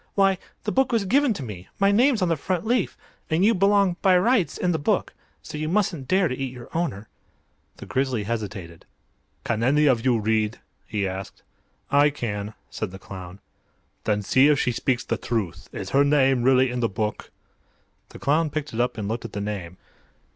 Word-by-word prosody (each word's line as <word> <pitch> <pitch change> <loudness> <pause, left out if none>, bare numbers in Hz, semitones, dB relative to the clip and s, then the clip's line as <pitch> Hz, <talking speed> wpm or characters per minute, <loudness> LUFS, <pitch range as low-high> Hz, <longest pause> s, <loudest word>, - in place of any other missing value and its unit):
"Why, 195 -2 +3 0.2
the 210 - -1
book 265 +1 +2
was 225 -4 +1
given 275 +6 +3
to 140 - -5
me; 100 -6 -8
my 200 0 +4
name's 235 0 +3
on - - +2
the 165 - +2
front 180 +5 -2
leaf. 235 -3 0 0.3
And 165 +5 +2
you 225 - +5
belong, 195 -2 +3
by 185 -2 +5
rights, 195 - +2
in 180 - +1
the 160 - 0
book. 145 - 0 0.3
So 150 - -7
you 155 0 -2
mustn't 180 -8 0
dare 185 +2 +3
to 125 - -3
eat 135 -1 -4
your 125 +2 -12
owner!" 110 - -2 0.7
The - - -9
Grizzly 130 -4 -1
hesitated. 100 -6 -5 0.6
"Can 115 -1 -1
any 145 +5 +3
of 125 -5 +3
you 125 -3 +3
read?" 110 0 0 0.3
he 100 -2 -1
asked. 95 +1 -7 0.5
"I 145 +1 +5
can," 105 -6 -4 0.2
said 110 - -3
the 95 - -9
clown. 95 0 -10 0.6
"Then 105 -1 +1
see 130 +8 +5
if 150 -2 +4
she 125 - +1
speaks 120 +1 0
the - - -2
truth. 95 -7 -3
Is 95 - -6
her 140 +1 +5
name 135 -3 +3
really 130 0 +4
in 125 - -2
the 115 -2 +1
book?" 105 +2 -3 0.8
The - - -11
clown 155 +3 +1
picked 150 -2 -4
it 115 - 0
up 125 -1 -1
and 105 -2 -3
looked 115 +3 -3
at - - -8
the 100 - -3
name. 95 -4 -5
130 Hz, 200 wpm, -24 LUFS, 110-175 Hz, 0.8 s, you